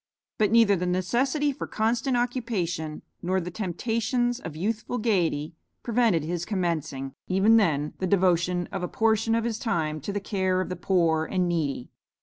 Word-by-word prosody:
But 210 -2 +4
neither 225 -3 +5
the 180 0 -2
necessity 255 - +1
for 265 - -6
constant 235 +3 0
occupation 200 -11 -2 0.2
nor 185 +2 0
the 180 0 -5
temptations 230 +5 -1
of 160 -9 -7
youthful 215 +7 -2
gaiety, 175 -9 0 0.3
prevented 230 -9 +2
his 170 +2 -3
commencing, 155 -9 -2
even 195 +5 +4
then, 150 -8 +1
the 185 - -1
devotion 180 -2 +2
of 195 -2 -3
a 180 - -1
portion 225 +1 +1
of 230 - +1
his 230 -2 -2
time, 155 - -1
to 200 - -4
the 205 - -2
care 190 -2 0
of 185 - -2
the 180 - -3
poor 165 -5 +1
and 185 0 0
needy. 150 -7 -2
190 Hz, 165 wpm, -26 LUFS, 170-225 Hz, 0.3 s, neither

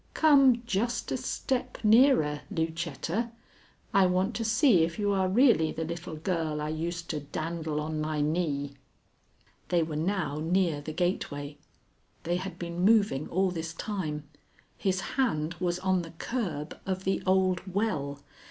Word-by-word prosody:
Come 275 -6 +5
just 235 +2 -1
a - - +1
step 260 -2 -2
nearer, 215 - +5
Lucetta. 165 - -2 0.6
I 195 -2 +5
want 185 +1 +1
to 230 - -2
see 225 - +4
if 165 0 -2
you 205 -1 +1
are 190 -1 +2
really 220 - +4
the 160 - -3
little 165 0 -5
girl 160 -2 -2
I 150 0 -2
used 165 +2 -3
to 155 - -2
dandle 155 +1 -3
on 155 0 -3
my 155 0 -2
knee." 145 -2 -1 1.0
They 175 -2 +3
were 155 -1 -4
now 160 -3 -1
near 165 -2 +1
the 155 - -6
gateway. 150 -4 -2 0.6
They 175 +1 0
had 185 +1 -6
been 170 0 -5
moving 200 -9 +3
all 190 +1 +1
this 165 -1 -5
time. 155 -8 -4 0.5
His 190 -1 0
hand 170 - 0
was 175 -1 0
on 185 0 +1
the 165 -1 -9
curb 170 - -3
of 190 0 -2
the 190 0 0
old 185 -1 +3
well. 150 -9 -1
175 Hz, 150 wpm, -29 LUFS, 155-195 Hz, 1.0 s, Come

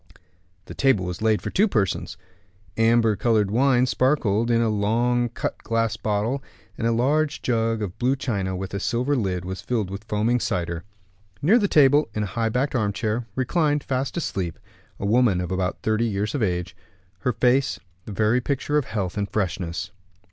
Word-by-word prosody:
The - - -9
table 120 -9 +2
was 90 +1 -5
laid 110 -1 +2
for - - -3
two 210 +4 +3
persons. 95 - -1 0.6
Amber 115 -1 +3
colored 105 -3 +1
wine 125 +1 +3
sparkled 125 -4 +1
in 115 -1 +3
a 115 - +2
long 120 +3 +1
cut 115 - -4
glass 115 -1 0
bottle; 110 +5 -1 0.3
and 115 - -1
a - - +2
large 145 +6 +1
jug 115 -2 0
of 90 -3 -6
blue 130 +2 +2
china, 100 -8 -2
with 95 +1 -5
a 100 - -2
silver 125 +7 0
lid, 95 -7 -1
was 95 +1 -5
filled 110 -6 -2
with 100 +2 -7
foaming 110 +3 +1
cider. 85 -5 -2 0.6
Near 210 +11 +5
the 205 - +2
table, 145 -2 +4
in 105 - 0
a 95 -3 -5
high 115 +1 0
backed 130 +5 0
armchair, 110 0 -1
reclined, 145 +2 +1
fast 135 +3 -2
asleep, 95 - -3 0.4
a - - -3
woman 110 -3 +3
of 90 0 -3
about 95 0 -2
thirty 110 +1 +1
years 105 -1 -1
of 145 - -2
age, 90 -4 -1 0.4
her 125 - 0
face 130 +4 +2 0.3
the - - -7
very 110 +4 +2
picture 145 +3 0
of 140 - -4
health 100 -2 -3
and 100 0 -2
freshness. 90 -2 -2
115 Hz, 180 wpm, -24 LUFS, 100-125 Hz, 0.6 s, Near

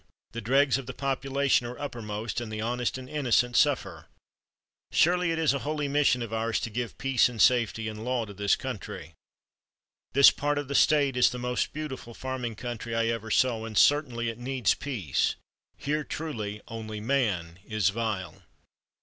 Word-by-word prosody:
The 120 - -5
dregs 135 +4 +3
of 130 - -9
the - - -6
population 135 -2 +1
are 120 0 -7
uppermost, 115 -4 -4
and 115 -2 -6
the 110 - -4
honest 120 +3 -1
and 130 -1 -9
innocent 125 -4 +1
suffer. 100 - +1 0.8
Surely 180 +1 +3
it 165 - 0
is 160 -3 +3
a 140 - -1
holy 145 +2 -2
mission 140 -3 +2
of 115 -1 -7
ours 115 0 0
to 115 - -4
give 120 +1 -4
peace, 135 -3 +3
and 120 -2 -9
safety, 115 -2 +3
and 110 0 -6
law 125 -1 -1
to 100 - -10
this 100 +1 +2
country. - - -7 1.0
This 140 +1 +8
part 145 0 -1
of 145 -1 -3
the - - -2
State 140 -2 +4
is 125 - +5
the 125 - -6
most 125 0 -1
beautiful 130 -6 -6
farming 130 -3 -4
country 120 0 -5
I 115 0 +1
ever 115 -1 -3
saw, 115 0 +2
and 110 -2 -5
certainly 125 -6 +3
it 115 0 -7
needs 130 0 +1
peace. 105 - -1 0.4
Here 150 +2 -1
truly 110 -11 -5
'only 110 -2 -6
man 105 -9 -1
is 110 -2 +1
vile.'" 100 -6 -3
120 Hz, 175 wpm, -28 LUFS, 110-140 Hz, 1.0 s, This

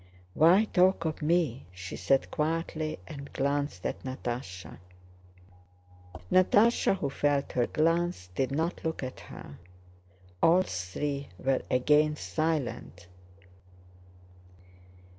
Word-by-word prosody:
"Why 175 - +5
talk 185 -3 +3
of 160 0 -3
me?" 155 -5 0
she 90 0 -8
said 135 -1 +1
quietly 155 0 -2
and 140 +6 -9
glanced 140 -7 -1
at - - -3
Natásha. 120 -8 -6 1.5
Natásha, 205 +3 +4
who 140 -6 -2
felt 145 0 0
her 120 -1 +1
glance, 165 - 0
did 130 +7 -1
not 160 +5 -2
look 160 -3 -3
at 130 - -6
her. 70 - -11 0.8
All 175 +3 +5
three 140 - -4
were 130 +3 0
again 150 +4 +3
silent. 145 - -3
145 Hz, 105 wpm, -29 LUFS, 130-165 Hz, 1.5 s, Why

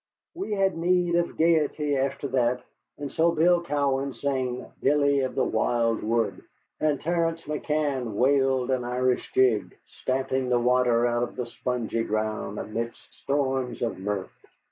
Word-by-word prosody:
We 335 - -4
had 195 -1 +1
need 175 0 +2
of 170 0 0
gayety 155 -3 +2
after 140 +1 -1
that, 125 -1 +1 0.3
and 145 -1 -5
so 170 +1 +3
Bill 170 +2 +3
Cowan 140 -4 0
sang 130 -3 -2 0.2
"Billy 140 0 +3
of 130 -1 -2
the - - +2
Wild 115 -2 +1
Wood," 110 -3 0 0.4
and 150 -2 +1
Terence 165 0 0
McCann 150 -5 -1
wailed 135 0 +2
an 130 -1 0
Irish 125 +1 0
jig, 125 -5 +2
stamping 130 0 -2
the 125 - +3
water 120 -1 +3
out 120 0 +1
of 120 - -3
the 125 - -3
spongy 120 -1 -2
ground 110 -1 -2
amidst 115 +3 -5
storms 135 -3 -1
of 115 -5 -2
mirth. 100 0 -3
130 Hz, 145 wpm, -26 LUFS, 120-150 Hz, 0.4 s, so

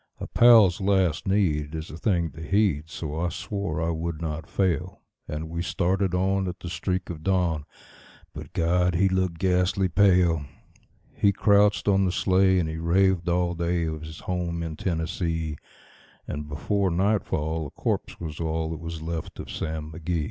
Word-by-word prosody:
A - - -4
pal's 110 -6 +6
last 95 -5 +1
need 80 -7 +1
is 80 +1 -6
a - - -7
thing 85 -2 0
to 80 - -11
heed, 80 -3 +1
so 80 -1 -5
I 85 +1 0
swore 100 -5 -4
I 85 +1 0
would 80 -1 -3
not 80 -1 -4
fail; 95 -6 -1 0.2
And 75 +1 -4
we 85 +1 -4
started 90 +1 0
on 95 +1 +1
at 90 0 -5
the 85 - -5
streak 90 0 -2
of 80 -2 -8
dawn; 85 -4 0 0.7
but - - -9
God! 90 +1 +2
he 95 +3 +4
looked 95 -2 0
ghastly 90 +1 +1
pale. 90 -4 +4 0.7
He 100 - +3
crouched 100 +1 +3
on 100 -1 +4
the 90 - +1
sleigh, 95 0 +3
and 85 -3 +1
he 80 0 -4
raved 90 +1 +2
all 85 0 +1
day 85 0 0
of 80 -1 -4
his 80 0 -9
home 85 -2 -2
in 80 -1 -5
Tennessee; 80 -2 -2 0.7
And 75 0 -5
before 95 +6 0
nightfall 85 -5 0
a - - -10
corpse - - -3
was 80 -3 -6
all 80 -1 -1
that 80 - -5
was 80 -1 -6
left 80 -1 -5
of - - -7
Sam 80 -1 -4
McGee. 80 +2 -2
85 Hz, 175 wpm, -26 LUFS, 80-95 Hz, 0.7 s, pal's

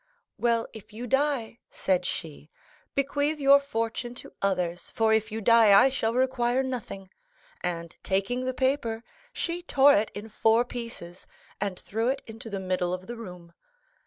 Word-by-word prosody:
'" - - -56
"Well, 230 -1 +2
if 220 -1 -12
you 235 +3 -6
die," 270 -3 0
said 185 -1 0
she, 155 -2 -6 0.5
"bequeath 285 +2 0
your 280 0 +7
fortune 240 -2 -3
to - - -11
others, 180 -3 -1
for 220 -1 +2
if 220 0 +1
you 220 +1 -3
die 220 -2 +7
I 270 - +6
shall 230 -4 -1
require 255 0 +1
nothing;" 215 -7 -6 0.5
and, 170 -2 -3
taking 200 +7 -1
the 255 - -1
paper, 255 -4 0 0.3
she 345 -6 -3
tore 285 -4 +5
it 210 +2 +1
in 210 +2 -6
four 225 +2 +3
pieces, 230 -8 -8 0.3
and 195 -2 -2
threw 225 +5 -2
it 275 +1 -2
into 225 0 -9
the 200 -2 -3
middle 185 -1 -1
of 185 0 -11
the 240 - -6
room. 180 -6 -10
225 Hz, 165 wpm, -27 LUFS, 195-255 Hz, 0.5 s, your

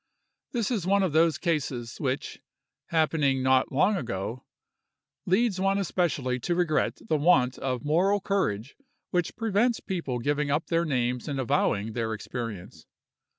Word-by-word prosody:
This 240 -4 -1
is 200 -7 -1
one 200 +1 +3
of 185 - +1
those 160 0 +4
cases 135 -8 -2
which—happening 140 +1 -2
not 130 0 +3
long 195 +9 +3
ago—leads 175 - -4
one 195 +1 +2
especially 150 -9 0
to 175 +8 -1
regret 170 -3 0
the 155 - +2
want 145 -5 +3
of 130 -2 -3
moral 185 +7 +3
courage 145 - -1 0.4
which 175 -3 0
prevents 225 +2 +1
people 170 -10 -3
giving 145 +4 0
up 150 +3 +1
their 170 0 +2
names 125 -4 -1
and 140 -2 -2
avowing 110 -3 0
their 110 -1 -2
experience. 110 -3 -7
150 Hz, 135 wpm, -27 LUFS, 125-185 Hz, 0.4 s, those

